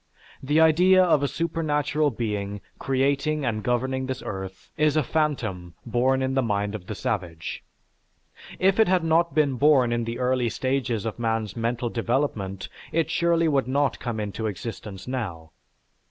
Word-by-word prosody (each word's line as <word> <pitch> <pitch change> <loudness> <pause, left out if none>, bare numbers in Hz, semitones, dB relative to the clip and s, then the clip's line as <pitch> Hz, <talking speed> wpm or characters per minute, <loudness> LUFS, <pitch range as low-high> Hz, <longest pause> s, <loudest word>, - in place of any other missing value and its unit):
The 145 +4 +2
idea 180 +4 +6
of 165 -5 +3
a 140 - +1
supernatural 150 -2 0
being 105 -4 -3 0.2
creating 140 +2 0
and 110 -3 -1
governing 130 +3 -1
this 130 0 -4
earth 95 -1 -7
is 150 0 +2
a 155 - +3
phantom 110 - -2
born 130 +3 +1
in 130 0 0
the 135 - +2
mind 105 -3 -1
of 100 -4 -7
the 110 - -4
savage. 90 -6 -4 0.9
If 195 +2 +2
it 220 - +6
had 180 -2 +2
not 165 -2 +2
been 145 -4 +2
born 135 -3 +4
in 120 -1 -1
the 115 +1 -4
early 125 -1 +1
stages 130 -4 -1
of 115 +1 -4
man's 115 -3 -1
mental 120 +1 -1
development, 115 -5 -1 0.2
it 160 -1 0
surely 170 -1 +2
would 140 -4 +1
not 140 +1 +1
come 115 -3 -3
into 105 +1 -3
existence 105 0 -6
now. 95 -11 -4
130 Hz, 160 wpm, -25 LUFS, 110-150 Hz, 0.9 s, idea